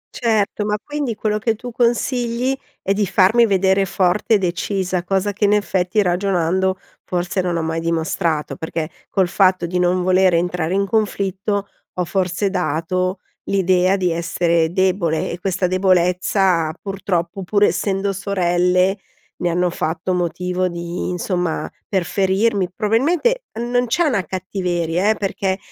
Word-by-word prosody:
Certo, 220 -3 0
ma 210 0 0
quindi 290 -6 -3
quello 210 0 -1
che 225 +1 0
tu 245 +3 -8
consigli 240 +1 0 0.3
è 195 - +1
di 205 +1 0
farmi 205 +5 +4
vedere 190 0 +3
forte 195 +4 +1
e - - +5
decisa. 185 0 -1
Cosa 195 +2 0
che 205 +1 0
in 205 - +4
effetti 200 0 +1
ragionando, 185 0 +1 0.3
forse 180 +1 -1
non 175 -2 -1
ho 165 - -1
mai 160 0 -2
dimostrato, 165 -1 -1
perché 160 0 -4 0.2
col 190 -2 +2
fatto 185 -1 +3
di 180 +1 -2
non 180 0 +2
voler 185 -1 +4
entrare 175 0 0
in 200 0 +2
conflitto, 200 -1 -1 0.2
ho 180 - -2
forse 190 +2 -1
dato 180 +2 -1 0.2
l'idea 185 0 +2
di 180 -2 0
essere 170 0 +1
debole 185 -4 0
e 170 - -6
questa 190 0 -1
debolezza 180 -2 +2
purtroppo, 195 -2 -3
pur 200 +3 +1
essendo 195 -1 +1
sorelle, 180 0 +1 0.4
ne 175 - -1
hanno 175 +1 +1
fatto 165 +2 -2
motivo 180 +1 -1
di 170 0 -4
insomma, 180 -1 -2 0.2
per 190 -3 +1
ferirmi. 195 +1 +1
Probabilmente 320 - +1 0.2
non 245 +1 0
c'è 345 +9 +1
una 235 - +1
cattiveria, 180 0 -1
eh, 220 - +3
perché 190 -1 -2
185 Hz, 145 wpm, -20 LUFS, 175-200 Hz, 0.4 s, e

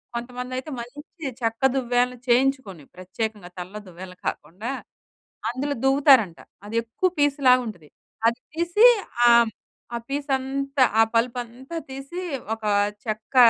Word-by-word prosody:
కొంతమందయితే 250 +3 -5
మంచి 290 +5 -7
చెక్క 225 -1 -1
దువ్వెనలు 250 -1 +1
చేయించుకొని, 245 - +2
ప్రత్యేకంగా 185 +1 -5
తల్లో 195 +4 -7
దువ్వేలను 180 +1 -10
కాకుండా 185 +10 -4 0.8
అందులో 280 +4 -2
దువ్వుతారంట. 270 - +5 0.3
అది 220 - -6
ఎక్కువ 235 +11 0
పీసులాగుంటది. 255 - +2 0.4
అది 235 +2 +1 0.2
తీసి 345 +7 +4 0.4
ఆహ్, 235 -1 +6 0.4
ఆ - - 0
పీసంతా 275 -1 0 0.2
ఆ - - +8
పలుపంతా 245 +5 -2
తీసి 275 +7 -6 0.3
ఒక 220 - -20 0.4
చెక్క 215 +3 -5
245 Hz, 105 wpm, -24 LUFS, 220-275 Hz, 0.8 s, ఆ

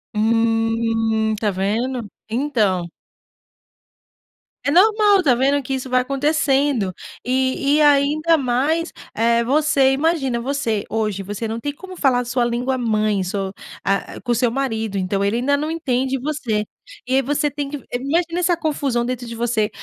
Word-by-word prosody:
Hum, 225 0 +1
tá 210 -1 +1
vendo? 220 +5 -2 0.2
Então! 220 -8 0 1.8
É 285 - 0
normal, 415 +3 +5
tá 265 -6 +4
vendo? 275 +3 +2
Que 270 - -4
isso 260 0 -4
vai 255 0 +3
acontecendo. 275 -5 +1 0.3
E 260 +1 +1 0.2
e - - +3
ainda 300 +3 +4
mais 285 +6 0 0.2
eh, 235 +1 +2
você, 280 +1 +3
imagina 270 -4 0
você 235 -5 -2
hoje, 215 -3 -1
você 205 +3 -4
não 225 +1 -4
tem 285 +4 -4
como 375 +5 -11
falar 260 -5 +3
a 245 - -3
sua 245 0 0
língua 245 +2 -1
mãe, 215 -4 +1
so 190 +1 -3 0.3
ah, 195 0 -1
com 245 - -2
o - - +3
seu 245 0 +2
marido, 225 -6 -2
então, 195 +1 -1
ele 200 +4 +1
ainda 285 +3 +1
não 300 +2 -2
entende 265 -5 -1
você. 250 -7 -2 0.4
E 260 - +1
aí, 270 - +4
você 290 +3 0
tem 285 0 -4
que 290 - -4
eh, 245 - -5
imagino 335 +6 -1
essa 355 0 +2
confusão 280 -7 -1
dentro 250 0 -4
de 230 - -6
você, 230 -2 0
255 Hz, 165 wpm, -20 LUFS, 225-285 Hz, 1.8 s, normal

